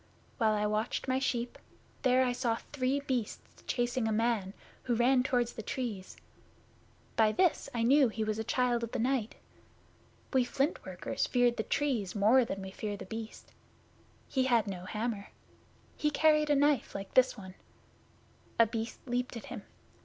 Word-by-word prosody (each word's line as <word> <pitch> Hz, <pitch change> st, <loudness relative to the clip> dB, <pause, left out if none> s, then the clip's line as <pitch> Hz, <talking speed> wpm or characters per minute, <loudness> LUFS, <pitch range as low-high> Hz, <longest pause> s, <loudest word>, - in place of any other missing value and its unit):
While 220 Hz, -2 st, +3 dB
I 210 Hz, 0 st, 0 dB
watched 215 Hz, +5 st, -1 dB
my 260 Hz, 0 st, +1 dB
sheep 245 Hz, -2 st, -2 dB, 0.4 s
there 255 Hz, 0 st, +4 dB
I 250 Hz, -, +1 dB
saw 240 Hz, -2 st, 0 dB, 0.2 s
three 270 Hz, 0 st, 0 dB
Beasts 250 Hz, -6 st, -4 dB
chasing 245 Hz, -1 st, 0 dB
a -, -, 0 dB
man, 215 Hz, -3 st, 0 dB, 0.3 s
who 245 Hz, -2 st, +1 dB
ran 250 Hz, +2 st, +4 dB
toward 245 Hz, -2 st, +1 dB
the 225 Hz, -, -7 dB
Trees. 215 Hz, -5 st, -5 dB, 1.0 s
By 220 Hz, -1 st, +4 dB
this 355 Hz, +1 st, +1 dB
I 235 Hz, -3 st, -1 dB
knew 270 Hz, +3 st, +5 dB
he 220 Hz, 0 st, -3 dB
was 215 Hz, 0 st, -2 dB
a -, -, -1 dB
Child 245 Hz, +1 st, +1 dB
of 235 Hz, +1 st, -5 dB
the -, -, 0 dB
Night. 240 Hz, -2 st, 0 dB, 1.0 s
We 260 Hz, -1 st, +4 dB
Flint 270 Hz, +5 st, -1 dB
workers -, -, -2 dB
fear 245 Hz, -1 st, +3 dB
the 235 Hz, -, -3 dB
Trees 235 Hz, -5 st, -1 dB
more 220 Hz, +6 st, +5 dB
than 195 Hz, -3 st, -5 dB
we 190 Hz, -, -7 dB
fear 205 Hz, +1 st, -4 dB
The -, -, -8 dB
Beast. 220 Hz, +3 st, -8 dB, 0.8 s
He 260 Hz, -2 st, +1 dB
had 235 Hz, -4 st, +3 dB
no 185 Hz, -3 st, -6 dB
hammer. 215 Hz, 0 st, -3 dB, 0.7 s
He 300 Hz, -, +1 dB
carried 305 Hz, 0 st, +3 dB
a 295 Hz, -, +4 dB
knife 285 Hz, -3 st, +2 dB
like 195 Hz, 0 st, -6 dB
this 255 Hz, -1 st, +4 dB
one. 190 Hz, -2 st, -9 dB, 1.0 s
A 230 Hz, -, +7 dB
Beast 225 Hz, 0 st, -5 dB
leaped 245 Hz, -1 st, -2 dB
at 230 Hz, -, -9 dB
him. -, -, -6 dB
240 Hz, 170 wpm, -31 LUFS, 215-260 Hz, 1.0 s, A